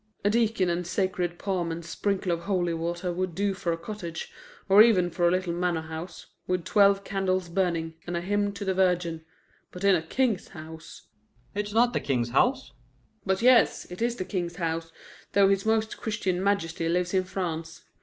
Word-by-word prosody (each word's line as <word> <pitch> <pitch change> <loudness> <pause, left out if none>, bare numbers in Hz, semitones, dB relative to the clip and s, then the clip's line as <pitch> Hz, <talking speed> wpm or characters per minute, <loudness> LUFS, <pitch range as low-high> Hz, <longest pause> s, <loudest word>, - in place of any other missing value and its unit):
"A 205 - +4
deacon 225 -4 +2
and 175 0 -1
sacred 180 -2 -1
palm 180 -4 -2
and 165 0 -6
sprinkle 190 +2 -1
of 170 0 -2
holy 180 -4 0
water 170 +2 -2
would 185 -1 -3
do 200 0 0
for 185 -3 -2
a 165 - -1
cottage, 170 -3 -6 0.4
or 195 +2 +8
even 190 -6 +5
for 175 +1 +2
a - - +3
little 185 -1 0
manor 175 -2 -1
house, 160 +2 -7 0.2
with 180 -2 -1
twelve 200 -1 +4
candles 185 -3 -1
burning, 170 -3 -1
and 175 0 -2
a - - -2
hymn 205 +2 0
to 200 0 -6
the 190 - +1
Virgin. 175 -3 +1 0.5
But 180 - -9
in 200 -1 +5
a 175 - +2
king's 215 +4 0
house 160 0 -11 0.3
" 120 +1 -36
"It's 205 0 -3
not 240 +3 +3
the - - +1
King's 120 -4 -1
house." 260 - +2 0.6
"But 190 +3 +1
yes, 250 -2 +5
it 180 - -8
is 235 0 +1
the 185 - -4
King's 175 -3 -3
house, 165 -2 -3 0.4
though 200 -1 +5
his 195 +1 +1
Most 220 0 +1
Christian 195 -5 -2
Majesty 165 -4 0
lives 175 +1 0
in 185 -1 +2
France. 165 -3 -4
180 Hz, 195 wpm, -27 LUFS, 170-200 Hz, 0.6 s, or